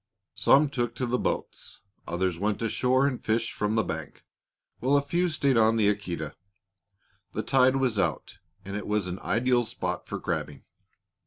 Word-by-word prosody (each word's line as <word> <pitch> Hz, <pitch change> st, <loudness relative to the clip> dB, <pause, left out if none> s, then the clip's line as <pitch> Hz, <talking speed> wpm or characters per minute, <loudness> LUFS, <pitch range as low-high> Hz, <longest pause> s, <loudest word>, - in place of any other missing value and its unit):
Some 145 Hz, +2 st, +4 dB
took 120 Hz, -3 st, -2 dB
to 125 Hz, -, -2 dB
the 125 Hz, +1 st, 0 dB
boats, -, -, -4 dB, 0.3 s
others 85 Hz, 0 st, -1 dB
went 105 Hz, +1 st, 0 dB
ashore 130 Hz, +4 st, +2 dB
and 135 Hz, -3 st, -2 dB
fished 110 Hz, +1 st, 0 dB
from 105 Hz, +1 st, -1 dB
the 110 Hz, -, +3 dB
bank, 80 Hz, -2 st, -6 dB, 0.5 s
while 135 Hz, +4 st, +3 dB
a -, -, +3 dB
few 175 Hz, +5 st, 0 dB
stayed 140 Hz, -5 st, +1 dB
on 110 Hz, 0 st, +4 dB
the 105 Hz, -2 st, +3 dB
Aquita. 90 Hz, -7 st, -3 dB, 1.0 s
The -, -, -2 dB
tide 130 Hz, 0 st, +4 dB
was 130 Hz, -6 st, +1 dB
out 85 Hz, -6 st, -2 dB, 0.3 s
and 100 Hz, +1 st, -5 dB
it 105 Hz, -, -4 dB
was 105 Hz, -2 st, 0 dB
an 90 Hz, +1 st, -5 dB
ideal 120 Hz, +1 st, +1 dB
spot 110 Hz, -, -4 dB
for -, -, -4 dB
crabbing. 75 Hz, -, -4 dB
115 Hz, 170 wpm, -27 LUFS, 100-130 Hz, 1.0 s, Some